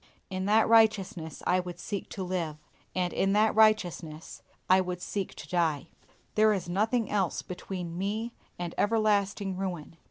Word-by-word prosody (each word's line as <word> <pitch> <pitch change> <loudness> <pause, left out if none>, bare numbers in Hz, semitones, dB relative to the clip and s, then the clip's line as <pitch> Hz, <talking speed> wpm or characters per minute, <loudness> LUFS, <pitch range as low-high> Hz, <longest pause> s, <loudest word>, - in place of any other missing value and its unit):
In 185 0 -2
that 215 +2 +4
righteousness 210 -8 +2
I 180 +1 +3
would 180 -1 -6
seek 200 +2 -5
to 190 - -5
live, 175 -4 -2 0.4
and 180 -1 0
in 195 +1 +1
that 215 +1 +4
righteousness 180 -8 +1 0.3
I 185 +1 +6
would 180 -1 -4
seek 195 +1 -4
to - - -9
die. 160 -6 0 0.4
There 215 0 +5
is 190 -4 -3
nothing 215 +6 +1
else 195 -5 0
between 180 -1 -6
me 215 +4 -2 0.2
and 175 -1 -4
everlasting 205 -3 +1
ruin. 175 -4 -5
190 Hz, 155 wpm, -29 LUFS, 175-210 Hz, 0.4 s, I